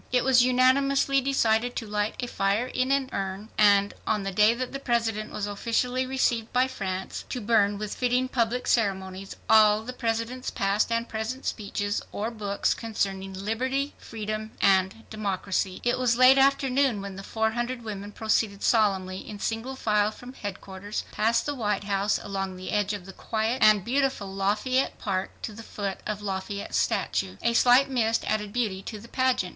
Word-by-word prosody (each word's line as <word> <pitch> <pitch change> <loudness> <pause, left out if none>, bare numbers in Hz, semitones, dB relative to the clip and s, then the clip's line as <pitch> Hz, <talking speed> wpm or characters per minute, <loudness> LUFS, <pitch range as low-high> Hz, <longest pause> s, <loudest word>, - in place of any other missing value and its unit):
It 250 -1 +3
was 255 -2 +5
unanimously 270 +2 +3
decided 245 -3 +1
to 225 - -3
light 210 0 -1
a - - -2
fire 200 +1 0
in 255 +1 -1
an 275 -1 +1
urn, 195 +2 -4
and, 205 -1 +4
on 210 -2 +1
the 195 - -3
day 210 +4 +4
that 255 +1 -4
the 275 - -5
President 225 -4 -1
was 205 - -3
officially 245 +5 -1
received 240 -4 0
by 250 +1 +3
France, 190 -6 -4
to 250 - -3
burn 205 -2 +2
with 210 0 -4
fitting 250 +1 +1
public 245 -1 0
ceremonies 195 -3 -1
all 215 -1 +6
the 250 +2 -6
President's 235 +1 -2
past 200 +3 0
and 230 +1 0
present 225 +4 -4
speeches 205 -1 -2
or 220 +3 -3
books 205 -3 -1
concerning 195 -4 -3
"liberty", 260 +8 -2
"freedom" 215 -1 -5
and 190 +3 +2
"democracy." 195 -3 -2
It 245 +1 +1
was 240 -2 +2
late 255 +2 +7
afternoon 270 -3 +3
when 195 -1 -6
the 195 - -7
four 220 +2 -1
hundred 240 +1 -3
women 205 -2 -6
proceeded 215 -2 0
solemnly 190 -4 +2
in 210 - -6
single 225 +5 -3
file 210 -4 +2
from 245 +4 -11
headquarters, 200 -2 -6
past 225 +2 +1
the 290 - -1
White 210 -6 -1
House, 200 0 +1
along 195 -1 -3
the 185 0 -6
edge 205 0 +1
of 200 -3 -6
the 190 - -10
quiet 225 +6 -2
and 215 -3 +5
beautiful 260 -6 0
Lafayette 210 +7 0
Park, 190 -2 -2
to 220 - -4
the 220 - -9
foot 200 -3 -5
of 210 -1 -4
Lafayette's 200 0 -4
statue. 95 0 -1
A 235 - +2
slight 245 +3 +5
mist 230 -4 +1
added 210 -1 -1
beauty 210 -5 -1
to 215 +2 -7
the 225 - -12
pageant. 255 -8 +1
220 Hz, 175 wpm, -26 LUFS, 200-250 Hz, -, late